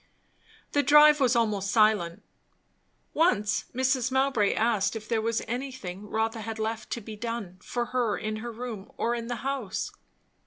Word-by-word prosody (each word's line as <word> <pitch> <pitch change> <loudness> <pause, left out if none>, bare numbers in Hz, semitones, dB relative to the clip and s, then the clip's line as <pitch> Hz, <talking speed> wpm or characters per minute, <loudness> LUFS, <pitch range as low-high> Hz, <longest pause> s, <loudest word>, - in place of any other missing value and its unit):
The 290 - +3
drive 300 +1 +7
was 255 -2 +3
almost 210 -4 +1
silent. 210 -6 +2 0.9
Once 215 - +2
Mrs. 260 0 +1
Mowbray 265 -6 +2
asked 215 -3 +1
if 215 -1 -6
there 225 -2 +1
was 230 0 -1
anything 230 -6 -5
Rotha 225 +1 -1
had 225 0 -5
left 220 0 -3
to 235 - -4
be 215 +1 -8
done 210 -5 -5
for 240 -1 -2
her 240 -5 +1
in 215 0 -3
her 235 +2 -5
room 225 -4 -7
or 235 - 0
in 235 -1 -4
the 245 - -2
house? 270 -8 -2
230 Hz, 160 wpm, -27 LUFS, 215-250 Hz, 0.9 s, drive